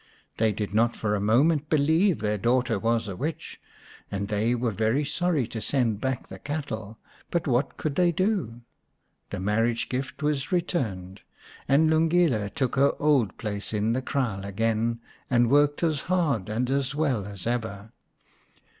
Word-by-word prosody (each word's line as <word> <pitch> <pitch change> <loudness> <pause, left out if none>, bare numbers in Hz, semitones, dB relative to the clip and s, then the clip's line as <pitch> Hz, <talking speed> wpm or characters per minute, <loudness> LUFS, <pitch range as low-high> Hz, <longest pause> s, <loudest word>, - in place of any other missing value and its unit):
They 110 -1 +3
did 105 0 -4
not 115 +2 +2
for 105 -1 -1
a 105 - +1
moment 145 +8 +3
believe 160 +5 +3
their 105 -1 0
daughter 120 0 +1
was 115 +1 0
a 95 - -5
witch, 155 - -5 0.5
and 100 +1 -3
they 110 +3 +1
were 120 -1 -1
very 110 +8 +1
sorry 160 -2 0
to 110 - -5
send 115 -6 0
back 130 -2 -2
the 95 - -10
cattle; 110 -7 -5 0.3
but 170 -2 -1
what 125 0 0
could 155 - -2
they 175 +3 +3
do? 170 - -1 0.7
The - - -4
marriage 115 +4 0
gift 130 +3 -4
was 145 -3 -1
returned, 105 - -2 0.5
and 145 +4 +4
Lungile 160 - +2
took 130 +3 -2
her 140 +1 +4
old 140 -10 +2
place 105 -1 -4
in 105 +2 +1
the 130 - 0
kraal 120 -8 -2
again 115 +3 0 0.3
and 120 -1 +3
worked 145 +2 +3
as 155 -4 +1
hard 155 - 0
and 115 +4 -1
as 135 0 0
well 135 -10 0
as 100 -3 -8
ever. 110 -3 -3
120 Hz, 165 wpm, -26 LUFS, 110-145 Hz, 0.7 s, and